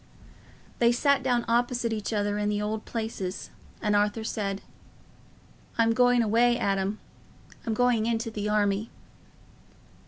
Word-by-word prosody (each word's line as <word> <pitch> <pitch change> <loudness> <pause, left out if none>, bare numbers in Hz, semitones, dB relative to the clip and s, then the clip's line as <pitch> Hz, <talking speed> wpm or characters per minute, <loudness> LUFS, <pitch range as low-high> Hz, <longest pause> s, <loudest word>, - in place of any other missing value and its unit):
They 235 0 +5
sat 280 +3 +2
down 245 -2 +1
opposite 240 0 +1
each 215 0 -3
other 205 -1 0
in 210 0 0
the 205 0 0
old 215 +1 -3
places, 220 -5 -4 0.3
and 210 -1 +2
Arthur 210 +2 +1
said, 200 -3 -3 1.1
"I'm 230 0 +3
going 245 0 +4
away, 235 +2 +3
Adam; 195 0 -1 0.7
I'm 225 - 0
going 240 -2 +2
into 230 0 -1
the 210 -1 -3
army." 210 0 +1
220 Hz, 130 wpm, -27 LUFS, 205-235 Hz, 1.1 s, They